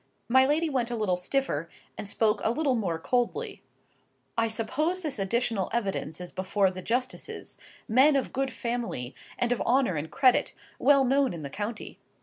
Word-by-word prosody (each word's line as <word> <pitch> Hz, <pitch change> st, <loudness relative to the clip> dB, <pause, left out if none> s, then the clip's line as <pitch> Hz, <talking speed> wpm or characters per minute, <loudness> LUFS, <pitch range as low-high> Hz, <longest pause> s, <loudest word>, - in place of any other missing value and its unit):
My 260 Hz, +2 st, +5 dB
lady 315 Hz, +3 st, +2 dB
went 255 Hz, -5 st, -1 dB
a 240 Hz, -, -2 dB
little 210 Hz, -5 st, +1 dB
stiffer, 180 Hz, -, -1 dB, 0.3 s
and 200 Hz, -, -5 dB
spoke 215 Hz, 0 st, +1 dB
a -, -, +2 dB
little 275 Hz, +3 st, +1 dB
more 195 Hz, -9 st, -1 dB
coldly:— 255 Hz, -, -1 dB, 0.7 s
"I 230 Hz, 0 st, +2 dB
suppose 305 Hz, +11 st, 0 dB
this 290 Hz, -8 st, -3 dB
additional 215 Hz, 0 st, 0 dB
evidence 195 Hz, -8 st, -2 dB
is 180 Hz, -1 st, -6 dB
before 190 Hz, +1 st, +1 dB
the 185 Hz, 0 st, -7 dB
justices: 250 Hz, +6 st, -3 dB, 0.3 s
men 265 Hz, +6 st, +5 dB
of 270 Hz, -, -1 dB
good 270 Hz, 0 st, -1 dB
family, 230 Hz, -, -3 dB, 0.2 s
and 245 Hz, 0 st, 0 dB
of 245 Hz, -, 0 dB
honour 250 Hz, -4 st, +2 dB
and 150 Hz, +2 st, -4 dB
credit, 255 Hz, -2 st, +3 dB, 0.2 s
well 275 Hz, -1 st, +5 dB
known 270 Hz, -1 st, +2 dB
in 165 Hz, -3 st, -7 dB
the 140 Hz, -, -6 dB
county. 210 Hz, +2 st, -5 dB
235 Hz, 170 wpm, -28 LUFS, 195-265 Hz, 0.7 s, My